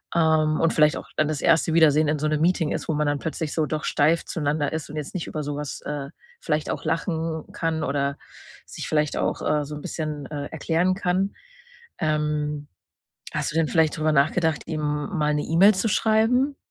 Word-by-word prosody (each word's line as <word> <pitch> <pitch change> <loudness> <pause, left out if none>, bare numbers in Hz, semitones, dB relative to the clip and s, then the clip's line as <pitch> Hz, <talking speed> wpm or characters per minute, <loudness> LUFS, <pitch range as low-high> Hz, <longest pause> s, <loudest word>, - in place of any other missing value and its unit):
ähm, 155 -2 +3
und 165 - +2
vielleicht 150 -1 +4
auch - - -8
dann 155 - +3
das 150 -2 -2
erste 165 0 +3
Wiedersehen 155 -2 +5
in 150 +1 +1
so 155 +1 -1
'nem 155 0 0
Meeting 165 -2 +2
ist, - - -3
wo 160 - +2
man 150 0 +1
dann 145 -1 0
plötzlich 160 -1 -3
so 160 - +1
doch 155 +2 -3
steif 160 +3 +2
zueinander 145 -1 -1
ist 160 -1 -4
und 150 - -8
jetzt 150 -2 -5
nicht 175 - -3
über 155 -1 -4
so 145 0 -3
was, 145 -1 -5
äh, 145 -2 -5 0.3
vielleicht 150 0 -1
auch - - -4
lachen 160 -1 -2
kann 160 -1 -1
oder 140 0 -1 0.5
sich - - -7
vielleicht 150 -1 +1
auch, - - -1
äh, 150 -1 +1
so 150 +1 -7
'n 150 - -7
bisschen, 150 -3 -4
äh, 145 -1 -4
erklären 165 +4 0
kann. 190 +1 0 0.7
Ähm, 150 -1 -1 0.7
hast - - -1
du - - -9
denn 165 -1 +2
vielleicht 160 -2 +2
drüber 155 0 +1
nachgedacht, 155 +3 +2
ihm 155 -2 -3
mal 150 +1 -1
'ne 150 - 0
E-Mail 190 +6 +5
zu 190 +5 0
schreiben? 230 +7 +2
155 Hz, 205 wpm, -24 LUFS, 150-165 Hz, 0.7 s, Wiedersehen